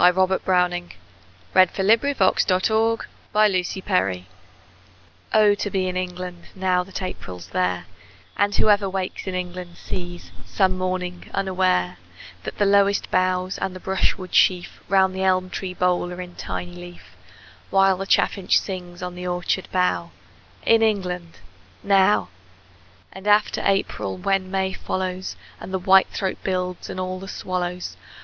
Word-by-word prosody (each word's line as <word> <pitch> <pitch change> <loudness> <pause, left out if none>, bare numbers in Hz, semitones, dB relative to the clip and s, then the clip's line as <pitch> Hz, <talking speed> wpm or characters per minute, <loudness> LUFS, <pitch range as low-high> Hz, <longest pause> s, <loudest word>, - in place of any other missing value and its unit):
Robert 190 +1 +2
Browning 180 -1 +1 0.6
Home 185 0 +7 0.5
Thoughts, 190 -5 +3
From 185 - +2 0.2
Abroad 225 +1 +2 2.3
OH, 210 -1 +6
to 205 0 -2
be 190 -2 0
in 185 - -3
England 180 -1 -5
Now 185 -1 +1
that 190 0 -6
April's 90 - -7
there, 90 -1 0 0.5
And 205 0 +1
whoever 205 -2 +3
wakes 190 0 -4
in 185 - -2
England 180 -1 -5
Sees, 175 -1 -6
some 190 -2 +1
morning, 185 -1 -3
unaware, 185 - +1 0.5
That - - -5
the 205 - +3
lowest 200 0 +3
boughs 185 0 +1
and 190 -1 -3
the - - -7
brush 190 +1 0
wood 185 -1 -9
sheaf 180 -1 +3
Round 190 -1 +4
the 190 - -4
elm 185 -1 +2
tree 185 -2 -4
bole 180 -1 +1
are 180 - -7
in 180 -1 -7
tiny 175 0 -5
leaf, 175 0 -12 0.5
While 195 -1 +4
the 195 +1 -5
chaffinch 195 -1 +3
sings 180 -2 -5
on 180 0 -4
the 180 0 -6
orchard 180 +1 -1
bough 180 -2 +1 0.6
In 225 0 +5
England 180 -6 -1 0.5
now! 190 - +4 0.8
And 190 +2 -9
after 210 0 +3
April, 195 - 0
when 185 - 0
May 190 0 -1
follows, 185 0 -3 0.2
And - - -8
the 190 - 0
whitethroat 190 0 +3
builds, 180 -1 -2
and 185 - -5
all 185 0 -3
the 195 - -9
swallows! 180 -1 -4
185 Hz, 140 wpm, -23 LUFS, 180-190 Hz, 2.3 s, Home